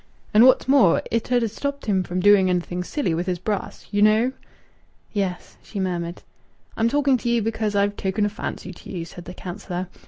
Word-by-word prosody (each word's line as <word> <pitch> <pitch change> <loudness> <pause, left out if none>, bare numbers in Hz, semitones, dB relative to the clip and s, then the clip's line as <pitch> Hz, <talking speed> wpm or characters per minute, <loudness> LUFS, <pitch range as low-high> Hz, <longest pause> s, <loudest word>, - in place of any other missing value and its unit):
And 220 +3 +7
what's 260 - +4
more, 265 -11 +5
it 230 +2 -1
'ud 245 -1 +3
ha' - - +1
stopped 280 +6 -4
him 195 -3 +2
from 180 0 -3
doing 200 -1 +5
anything 180 0 -1
silly 225 - -1
with 175 +3 -2
his 180 -1 0
brass! 200 +3 -4
You 205 -1 +1
know." 215 +4 +4 0.8
"Yes," 195 -4 -3
she 205 - -7
murmured. 175 -2 -3 0.5
"I'm 225 +1 +2
talking 280 0 +3
to 240 - -2
ye 235 0 +3
because 220 -1 -1
I've 200 0 +2
taken 195 +2 -1
a - - +1
fancy 200 -2 -6
to - - -13
ye," 175 -4 -4
said 170 +1 -11
the 180 +1 -9
councillor. 180 -1 -6
205 Hz, 200 wpm, -23 LUFS, 180-225 Hz, 0.8 s, And